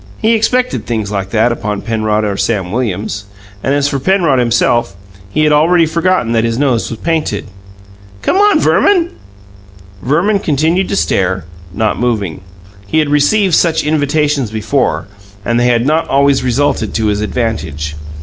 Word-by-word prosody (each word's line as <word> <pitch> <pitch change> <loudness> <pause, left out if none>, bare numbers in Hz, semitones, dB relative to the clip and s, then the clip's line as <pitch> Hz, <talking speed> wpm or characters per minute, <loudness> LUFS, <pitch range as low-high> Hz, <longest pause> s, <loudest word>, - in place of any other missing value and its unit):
He 225 +1 +2
expected 250 +3 0
things 110 -4 -2
like 100 -2 -3
that 115 +3 +2
upon 105 -3 -3
Penrod 110 -1 0
or 100 -1 -1
Sam 95 -4 -1
Williams. 105 -3 -3 0.4
And 135 +5 0
as 145 0 +1
for 140 -1 -2
Penrod 170 -4 +2
himself, 120 -2 +1 0.3
he 155 +10 0
had 150 -1 +3
already 165 +3 +4
forgotten 165 -5 0
that 115 -1 +2
his 115 0 -1
nose 130 -4 0
was 115 - -6
painted. 155 -8 -2 0.8
"Come - - +1
on, 410 +1 +4
Verman!" 355 -4 +2 0.9
Verman 175 - +1
continued 165 +3 0
to - - -1
stare, 95 - 0 0.3
not 110 +3 -1
moving. 105 -8 -2 0.5
He 130 - -1
had 155 -2 +2
received 175 +7 +2
such 165 0 +2
invitations 150 -3 0
before, 110 +5 -1 0.4
and 120 0 +1
they 120 - +2
had 120 -1 +2
not 155 +3 +1
always 140 0 +2
resulted 125 -3 0
to 110 - 0
his 105 -1 0
advantage. 90 - -3
125 Hz, 160 wpm, -14 LUFS, 110-160 Hz, 0.9 s, already